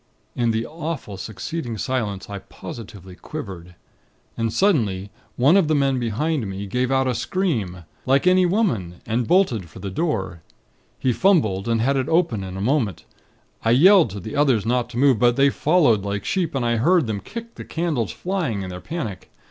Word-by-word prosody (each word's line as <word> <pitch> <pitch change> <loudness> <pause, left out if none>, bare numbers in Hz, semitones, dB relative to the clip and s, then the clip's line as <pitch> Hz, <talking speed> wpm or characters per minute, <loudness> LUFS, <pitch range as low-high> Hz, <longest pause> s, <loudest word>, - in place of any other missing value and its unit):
In 120 -1 +1
the 115 +1 0
awful 160 -9 -5
succeeding 115 - -5
silence, 110 -6 -2
I 100 -1 -6
positively 95 -2 -10
quivered. 90 - -8 0.6
And 115 -1 -1
suddenly, 110 - +1 0.2
one 140 +8 +4
of 195 -5 +4
the 155 - +2
men 135 -2 +2
behind 120 +3 -1
me, 95 +1 -5
gave 125 +6 -1
out 135 0 +2
a 130 - +1
scream, 115 - -2 0.2
like 135 +4 +3
any 185 0 +5
woman, 125 - 0
and 115 +1 -1
bolted 125 - +2
for - - -14
the 100 - -5
door. 95 - -2 0.6
He 130 - +1
fumbled, 115 - +2
and 115 -1 +1
had 135 +4 +2
it 130 - -1
open 160 - +1
in 95 0 -6
a - - -4
moment. 115 - 0 0.6
I 115 - +1
yelled 170 - +6
to 100 +1 -6
the 105 +3 -7
others 135 -8 +2
not 120 +1 0
to - - -7
move; 130 -3 +4
but 120 -1 +4
they 140 +1 +4
followed 150 - +3
like 100 0 -3
sheep, 170 -6 -1
and 130 -3 0
I 120 0 +1
heard 165 +6 +3
them 110 -3 -2
kick 230 - -8
the - - -9
candles 160 - -2
flying, 170 - -2
in 95 - -6
their 90 0 -7
panic. 140 - -5
120 Hz, 190 wpm, -22 LUFS, 100-155 Hz, 0.6 s, yelled